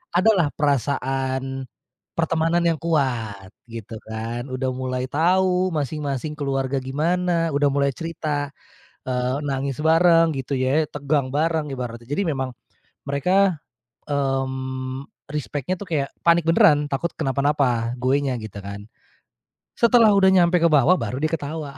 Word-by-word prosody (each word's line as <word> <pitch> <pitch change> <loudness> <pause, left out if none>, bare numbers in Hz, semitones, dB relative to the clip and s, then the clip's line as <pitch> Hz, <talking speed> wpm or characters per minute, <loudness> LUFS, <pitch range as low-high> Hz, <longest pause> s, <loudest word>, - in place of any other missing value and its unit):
adalah 185 -3 +4
perasaan, 135 -1 -1 0.5
pertemanan 165 +1 +1
yang 165 -2 +1
kuat, 120 - -1 0.2
gitu 115 -1 -8
kan. 115 +3 -4
Udah 130 0 -2
mulai 130 0 -3
tahu 180 +4 +2
masing-masing 150 0 -3
keluarga 135 -1 -1
gimana, 165 +5 0
udah 145 0 +2
mulai 140 0 +1
cerita, 155 -3 -3 0.6
eee, 125 0 0
nangis 135 0 -2
bareng 165 0 +5
gitu 135 +1 -5
ya, 135 +5 +2
tegang 140 -2 -1
bareng 160 0 0
ibaratnya. 120 -3 -6
Jadi 145 +7 0
memang 135 -4 -2 0.6
mereka, 180 +4 +2 0.5
mmm, 130 -1 -2 0.3
respect-nya 150 +3 -3
tuh 205 - -6
kayak 145 -4 0 0.2
panik 170 0 +5
beneran, 150 -3 +5
takut 150 +5 -2
kenapa-napa, 135 -4 +1
gue 130 +2 +2
nya 135 -2 -1
gitu 105 -2 -8
kan. 100 0 -6 1.0
Setelah 235 -2 +5
udah 195 -1 +5
nyampe 180 -1 +4
ke 170 - +2
bawah 155 +4 +5
baru 115 -1 -3
dia 155 - +1
ketawa. 150 -2 -4
140 Hz, 130 wpm, -23 LUFS, 130-165 Hz, 1.0 s, bareng